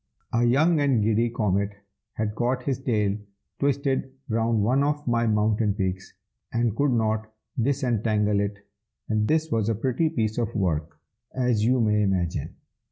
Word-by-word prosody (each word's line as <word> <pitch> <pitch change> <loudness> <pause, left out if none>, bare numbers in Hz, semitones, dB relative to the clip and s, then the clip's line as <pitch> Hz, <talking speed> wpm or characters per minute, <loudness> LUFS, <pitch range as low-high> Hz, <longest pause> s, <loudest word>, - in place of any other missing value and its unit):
A 120 - +3
young 155 +7 +4
and 135 -7 +2
giddy 115 +2 +2
Comet 100 -3 0 0.4
had 105 -1 -2
got 125 +3 -1
his 135 -2 -1
tail 105 -6 0 0.4
twisted 140 -1 0 0.2
round 115 -1 +1
one 130 +6 +3
of 145 0 -1
my 115 -1 +2
mountain 105 -1 +2
peaks, 95 -2 -3 0.4
and 115 -2 0
could 145 +2 +2
not 110 -2 0 0.3
disentangle 110 -6 +1
it, 100 0 -4 0.4
and 105 -1 +1
this 160 0 +1
was 110 -1 +1
a 115 - +1
pretty 130 +8 0
piece 110 -4 -1
of 115 -4 -2
work, 80 -5 -1 0.4
as 125 -4 +1
you 125 +3 +3
may 105 -2 +2
imagine. 90 -7 -1
115 Hz, 155 wpm, -25 LUFS, 105-130 Hz, 0.4 s, young